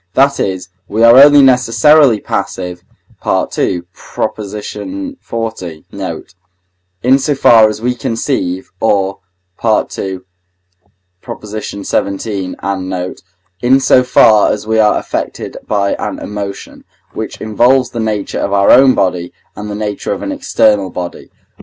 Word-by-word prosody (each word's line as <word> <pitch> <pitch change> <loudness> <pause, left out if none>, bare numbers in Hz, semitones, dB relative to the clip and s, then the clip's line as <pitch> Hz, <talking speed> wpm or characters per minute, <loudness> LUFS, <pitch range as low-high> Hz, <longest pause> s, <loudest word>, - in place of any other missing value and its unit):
that 140 +1 +3
is, 95 -1 -3 0.2
we 110 +2 0
are 115 +1 +8
only 145 -1 +7
necessarily 125 0 +4
passive 90 -3 -4 0.4
(II. 90 -2 -1
xl. 110 - -5 0.8
note), - - -7 0.7
in 130 +3 +4
so 145 +1 0
far 115 -4 +6
as 105 0 -6
we 125 +1 +1
conceive, 115 -6 -3
or 100 -3 0 0.4
(II. 110 -2 +3
xvii. 95 -1 -5 2.4
and 95 -2 -3
note) 90 -1 -5 0.4
in 130 +2 +4
so 130 -1 +4
far 110 -4 +4
as 105 - -4
we 110 0 +1
are 105 -1 +3
affected - - -5
by 100 -2 0
an - - -4
emotion, 100 -1 -7 0.3
which - - -6
involves 120 +4 +2
the 120 - -5
nature 110 -3 -2
of 100 - -2
our 100 0 +4
own 130 +1 +6
body, 90 -2 -1 0.2
and 105 0 -7
the 105 - -4
nature 105 -1 -4
of - - -6
an 290 - -3
external 110 - +1
body. 90 0 -7
110 Hz, 130 wpm, -14 LUFS, 100-125 Hz, 2.4 s, are